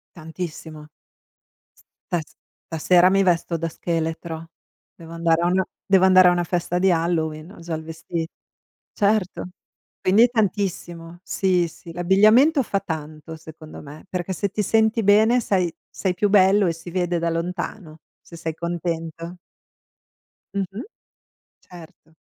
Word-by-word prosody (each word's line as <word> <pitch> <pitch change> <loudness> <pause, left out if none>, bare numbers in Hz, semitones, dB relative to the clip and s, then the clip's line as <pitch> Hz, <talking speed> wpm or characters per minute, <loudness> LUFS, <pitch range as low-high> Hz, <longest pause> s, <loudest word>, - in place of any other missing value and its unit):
Tantissimo. 160 -2 -8 1.2
Stas 165 -4 -3 0.3
stasera 175 +3 +3
mi 195 0 +3
vesto 175 -2 +1
da 165 +1 -2
scheletro, 165 0 -4 0.5
devo 165 0 -13
andare 165 0 +1
a - - +2
una 185 +1 +2 0.2
devo 190 -1 +4
andare 185 -1 +7
a - - +4
una 175 0 +1
festa 175 +1 -1
di 190 0 +3
Halloween, 165 0 -1
ho 205 - -14
già 165 0 -6
il 160 - -6
vesti 165 +1 -5 0.7
Certo. 200 -3 0 0.5
Quindi 215 +6 +5
tantissimo. 175 -6 -2
Sì, 180 -3 +1
sì. 165 +1 -13
L'abbigliamento 215 - +4
fa 200 -2 -1
tanto, 160 -2 -7
secondo 155 0 -12
me, 150 +4 -12
perché 180 0 -3
se 200 +2 -2
ti 210 - -2
senti 220 +2 +2
bene, 220 +5 +5
sai, 185 -6 0 0.2
sei 185 -2 -2
più 205 +3 0
bello 195 0 +5
e - - +2
si 165 +1 -10
vede 175 -1 0
da 170 0 0
lontano, 170 0 -4 0.2
se 170 - -14
sei 160 -1 -4
contento. 170 0 -4 1.2
Mh-mh. 195 +3 -3 0.8
Certo. 170 -2 -15
175 Hz, 135 wpm, -22 LUFS, 165-190 Hz, 1.2 s, andare